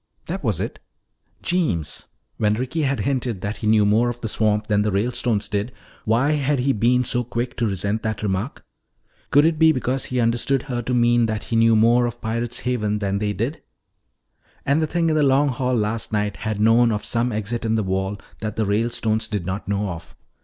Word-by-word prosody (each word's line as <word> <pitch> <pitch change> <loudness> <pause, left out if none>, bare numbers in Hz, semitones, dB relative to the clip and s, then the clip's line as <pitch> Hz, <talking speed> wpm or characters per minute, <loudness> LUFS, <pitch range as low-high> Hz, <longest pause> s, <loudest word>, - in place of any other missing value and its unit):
That - - -5
was - - 0
it. - - -4 0.6
Jeems! 155 - -1 0.3
When 105 -1 +2
Ricky 130 +8 -2
had 140 -2 0
hinted 125 -7 -1
that 105 +2 -3
he 110 - -3
knew 105 -1 +4
more 110 +4 +3
of 120 0 -5
the 115 - -2
swamp 105 -1 +1
than 105 -1 +2
the 105 0 0
Ralestones 110 +1 0
did, 105 +3 -2 0.3
why 120 +7 +2
had 145 -2 +1
he 135 +2 +2
been 125 +3 +2
so 125 0 0
quick 120 +2 -3
to 115 - +1
resent 100 +2 -2
that 110 -1 -3
remark? 100 +5 -3 0.6
Could 145 +2 +5
it 160 -1 +1
be 160 -1 +6
because 130 -1 -1
he 125 - -2
understood 120 +3 +1
her 125 -4 -3
to 125 +1 -2
mean 120 -1 +3
that 110 -1 -3
he 115 - -3
knew 115 0 +5
more 120 +2 +4
of 120 - -6
Pirate's 115 +1 -2
Haven 105 -4 -1
than 100 -1 -1
they 105 0 -1
did? 115 +10 -3 1.0
And 140 +3 +2
the 155 - +1
thing 165 0 +1
in - - +1
the 155 - +3
Long 140 +1 +3
Hall 125 0 -1
last 110 0 -1
night 105 -1 -1
had 110 -2 -3
known 115 +2 +4
of 105 -1 -2
some 120 +1 0
exit 110 +2 -3
in 110 0 +1
the 110 - +1
wall 95 +1 -2 0.2
that 105 -1 -4
the 110 - 0
Ralestones 110 +1 0
did 105 -5 -3
not 95 +2 -4
know 100 0 -1
of. 85 -2 -8
115 Hz, 210 wpm, -22 LUFS, 105-125 Hz, 1.0 s, be